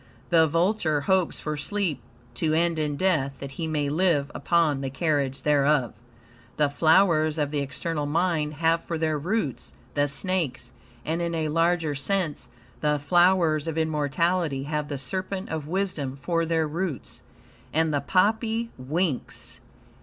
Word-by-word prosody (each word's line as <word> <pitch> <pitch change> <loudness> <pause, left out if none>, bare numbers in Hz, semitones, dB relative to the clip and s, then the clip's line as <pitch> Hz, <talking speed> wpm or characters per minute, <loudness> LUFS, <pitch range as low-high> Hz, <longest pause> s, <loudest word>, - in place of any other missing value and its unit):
The 165 -1 +5
vulture 165 -2 +1
hopes 185 +3 +1
for 150 -1 -3
sleep 160 -2 -2 0.3
to 155 -2 0
end 170 0 +1
in 150 -1 -1
death, 140 -8 0
that 140 -1 -7
he 160 +4 -4
may 150 -2 -1
live 150 -2 +1
upon 160 -5 +1
the 135 - -2
carrion 140 -1 0
thereof. 145 -3 +2 0.6
The 150 -2 +2
flowers 160 -1 +3
of 145 -2 0
the 150 - -1
external 145 +2 -3
mind 155 -1 0
have 165 +2 +1
for 165 - -3
their 155 -2 0
roots 165 - -2 0.2
the 145 0 +2
snakes; 150 -2 -2 0.3
and, 165 +2 -1
in 170 0 -1
a 155 -1 -1
larger 165 -1 +1
sense, 155 -2 -2 0.3
the 150 0 +1
flowers 170 0 +3
of 165 -1 -3
immortality 160 0 0
have 150 0 -2
the 145 - -4
serpent 185 +7 -4
of 155 -2 -4
wisdom 165 -7 -2
for 165 +4 -1
their 160 -1 +1
roots. 160 - -4 0.5
And 160 0 +1
the 145 - +1
poppy 220 - +1
winks. 150 +2 -3
155 Hz, 150 wpm, -26 LUFS, 145-175 Hz, 0.6 s, The